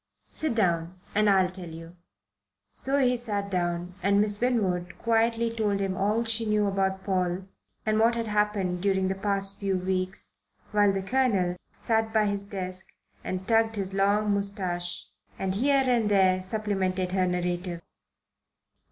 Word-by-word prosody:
"Sit 310 Hz, -7 st, -1 dB
down, 175 Hz, -3 st, 0 dB
and 210 Hz, 0 st, +3 dB
I'll 190 Hz, -2 st, +4 dB
tell 180 Hz, -2 st, -5 dB
you." 165 Hz, +1 st, -10 dB, 0.8 s
So 275 Hz, +1 st, 0 dB
he 250 Hz, -2 st, +3 dB
sat 205 Hz, -4 st, -3 dB
down 175 Hz, 0 st, -1 dB
and 200 Hz, +2 st, +3 dB
Miss 210 Hz, 0 st, +1 dB
Winwood 185 Hz, -8 st, 0 dB
quietly 230 Hz, 0 st, +1 dB
told 210 Hz, -3 st, 0 dB
him 195 Hz, -1 st, -1 dB
all 210 Hz, +4 st, +1 dB
she 225 Hz, 0 st, -1 dB
knew 210 Hz, -1 st, +2 dB
about 190 Hz, -1 st, 0 dB
Paul 185 Hz, -1 st, 0 dB, 0.4 s
and 215 Hz, 0 st, +2 dB
what 230 Hz, +1 st, +4 dB
had 230 Hz, -1 st, -2 dB
happened 210 Hz, -4 st, 0 dB
during 190 Hz, -1 st, +1 dB
the -, -, +1 dB
past 195 Hz, 0 st, -1 dB
few 195 Hz, -2 st, 0 dB
weeks, 185 Hz, +1 st, -2 dB, 0.4 s
while 205 Hz, -1 st, +4 dB
the 195 Hz, 0 st, -2 dB
Colonel 195 Hz, -6 st, +1 dB, 0.2 s
sat 225 Hz, -1 st, 0 dB
by 220 Hz, -1 st, +3 dB
his 200 Hz, -1 st, -1 dB
desk 185 Hz, -2 st, -5 dB, 0.4 s
and 185 Hz, 0 st, -4 dB
tugged 225 Hz, -1 st, +3 dB
his 195 Hz, -2 st, -2 dB
long 205 Hz, +2 st, +2 dB
moustache 185 Hz, -3 st, -2 dB, 0.3 s
and 190 Hz, -1 st, -1 dB
here 270 Hz, +6 st, +3 dB
and 240 Hz, -4 st, +2 dB
there 190 Hz, -2 st, +4 dB
supplemented 190 Hz, -2 st, -1 dB
her 185 Hz, -1 st, +1 dB
narrative. 175 Hz, -1 st, -2 dB
195 Hz, 155 wpm, -27 LUFS, 185-215 Hz, 0.8 s, I'll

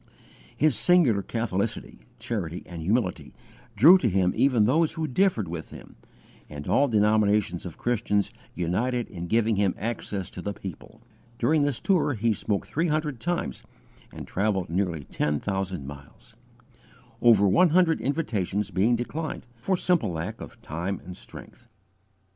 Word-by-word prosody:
His 150 Hz, -4 st, +3 dB
singular 140 Hz, -, +4 dB
catholicity, 110 Hz, 0 st, -3 dB, 0.2 s
charity, 105 Hz, -7 st, -4 dB
and 85 Hz, -2 st, -8 dB
humility 95 Hz, +2 st, -1 dB, 0.4 s
drew 160 Hz, -, +8 dB
to 120 Hz, -, +1 dB
him 95 Hz, -1 st, +2 dB
even 125 Hz, -6 st, +3 dB
those 155 Hz, +7 st, +2 dB
who 160 Hz, -2 st, -2 dB
differed 130 Hz, -, +1 dB
with 80 Hz, -1 st, -6 dB
him, -, -, -12 dB, 0.5 s
and 75 Hz, -1 st, -8 dB
all 145 Hz, -, +3 dB
denominations 105 Hz, -5 st, +2 dB
of 85 Hz, -, -10 dB
Christians 105 Hz, -4 st, 0 dB, 0.2 s
united 115 Hz, +8 st, -1 dB
in 85 Hz, -3 st, -6 dB
giving 110 Hz, +1 st, +2 dB
him 100 Hz, -2 st, +1 dB
access 105 Hz, -3 st, -4 dB
to 90 Hz, -, -7 dB
the 100 Hz, +3 st, -3 dB
people. 95 Hz, -5 st, -10 dB, 0.3 s
During 150 Hz, +6 st, +2 dB
this 145 Hz, -4 st, 0 dB
tour 170 Hz, -8 st, +1 dB
he 115 Hz, +1 st, +1 dB
spoke 100 Hz, 0 st, -2 dB
three 165 Hz, +4 st, -1 dB
hundred 150 Hz, -4 st, -1 dB
times, 170 Hz, -, -3 dB, 0.5 s
and -, -, -8 dB
travelled 95 Hz, -4 st, -1 dB
nearly 85 Hz, -4 st, -1 dB
ten 75 Hz, +2 st, -1 dB
thousand 95 Hz, -5 st, -3 dB
miles; 70 Hz, 0 st, -12 dB, 0.9 s
over 110 Hz, -4 st, +6 dB
one 175 Hz, -, +5 dB
hundred 165 Hz, -1 st, +3 dB
invitations 105 Hz, -, -1 dB
being 105 Hz, +7 st, +2 dB
declined, 150 Hz, +7 st, -4 dB
for 185 Hz, +11 st, 0 dB
simple 170 Hz, -, +1 dB
lack 80 Hz, -1 st, -5 dB
of -, -, -10 dB
time 85 Hz, +5 st, -3 dB
and 90 Hz, 0 st, -8 dB
strength. -, -, -12 dB
105 Hz, 150 wpm, -26 LUFS, 95-135 Hz, 0.9 s, drew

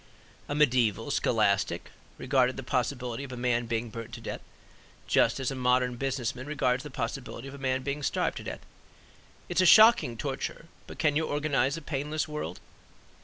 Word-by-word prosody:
A 145 Hz, -, -1 dB
mediaeval 120 Hz, -7 st, +2 dB
scholastic 105 Hz, -4 st, +1 dB, 0.3 s
regarded 130 Hz, -1 st, +2 dB
the 135 Hz, -, -5 dB
possibility 125 Hz, -1 st, -2 dB
of 135 Hz, -, -8 dB
a 125 Hz, -, -6 dB
man 120 Hz, -1 st, 0 dB
being 115 Hz, 0 st, -2 dB
burned 115 Hz, +1 st, -8 dB
to -, -, -9 dB
death 115 Hz, -, -6 dB, 0.6 s
just -, -, +3 dB
as 135 Hz, -1 st, -1 dB
a -, -, -4 dB
modern 125 Hz, -1 st, +2 dB
business 130 Hz, -2 st, -2 dB
man 130 Hz, +2 st, -9 dB
regards 130 Hz, -4 st, +1 dB
the 150 Hz, -, -8 dB
possibility 125 Hz, 0 st, -5 dB
of 135 Hz, -, -9 dB
a 140 Hz, -, -9 dB
man 130 Hz, -1 st, -1 dB
being 140 Hz, +2 st, -3 dB
starved -, -, 0 dB
to -, -, -6 dB
death: -, -, -7 dB, 0.8 s
"It -, -, -5 dB
is -, -, +6 dB
a -, -, +4 dB
shocking 215 Hz, -, +7 dB
torture; 140 Hz, +5 st, -4 dB, 0.2 s
but -, -, -10 dB
can 150 Hz, -3 st, +2 dB
you 160 Hz, +1 st, +1 dB
organize 145 Hz, -1 st, 0 dB
a 165 Hz, -, -8 dB
painless 150 Hz, +1 st, -2 dB
world?" 150 Hz, 0 st, -5 dB
130 Hz, 185 wpm, -28 LUFS, 120-145 Hz, 0.8 s, shocking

